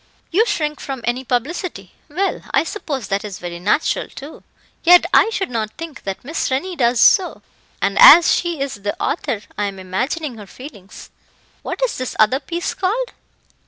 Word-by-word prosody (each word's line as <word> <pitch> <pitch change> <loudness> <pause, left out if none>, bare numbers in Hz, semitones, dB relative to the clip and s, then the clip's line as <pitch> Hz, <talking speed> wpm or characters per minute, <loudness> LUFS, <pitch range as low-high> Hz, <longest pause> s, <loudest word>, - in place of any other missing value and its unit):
"You 435 +7 +3
shrink 300 -6 -2
from 270 -3 -6
any 245 +2 -1
publicity; 250 - -3 0.2
well, 370 +7 -2
I - - +4
suppose 290 - -5
that 195 +1 -1
is 205 -3 -7
very 175 -1 -7
natural, 205 - 0
too, 285 +3 -11 0.4
yet 350 0 +7
I - - +5
should 390 - -3
not 220 -2 -3
think 330 -4 -9
that 195 -1 -5
Miss 315 +2 -2
Rennie 310 +8 -2
does 240 -4 +1
so; 380 -3 +4 0.4
and - - 0
as 485 -9 +9
she 345 -3 -1
is 270 -7 -4
the 205 0 -4
author, 255 -8 -2 0.2
I 205 - +1
am 200 -1 -5
imagining 245 - -3
her 205 - -11
feelings. 210 -6 -12 0.5
What - - -4
is - - -5
this 255 - -4
other 220 +5 +3
piece 340 +5 -4
called? 445 +7 -2
270 Hz, 175 wpm, -19 LUFS, 215-340 Hz, 0.5 s, as